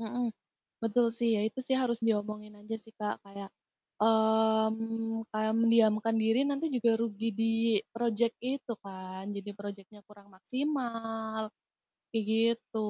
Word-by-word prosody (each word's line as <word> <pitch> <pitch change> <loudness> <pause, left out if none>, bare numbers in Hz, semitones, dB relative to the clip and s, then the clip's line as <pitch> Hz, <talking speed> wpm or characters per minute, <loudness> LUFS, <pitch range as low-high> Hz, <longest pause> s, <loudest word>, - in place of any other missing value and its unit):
Mhm, 235 +1 -2 0.5
betul 225 +2 +3
sih 235 0 0
ya, - - +1
itu 220 +4 -2
sih 260 +1 0
harus 245 -3 +1
diomongin 210 -1 -1
aja 215 +2 -5
sih, 225 - -18
Kak, 210 -1 -3
kayak 200 0 -9 0.5
mmm, 220 +1 +2 0.4
mendiamkan 225 -1 +4
diri 225 +2 +3
nanti 285 +3 0
juga 240 -2 +3
rugi 225 -1 -2
di 225 - +2 0.5
project 230 0 +1
itu 260 0 -3
kan, 190 0 -7
jadi 200 +1 -6
projectnya 205 0 -9
kurang 205 -1 -17
maksimal, 225 -2 -3 0.6
kayak 225 -2 0
gitu. 230 +1 +1
225 Hz, 130 wpm, -31 LUFS, 210-230 Hz, 0.6 s, mendiamkan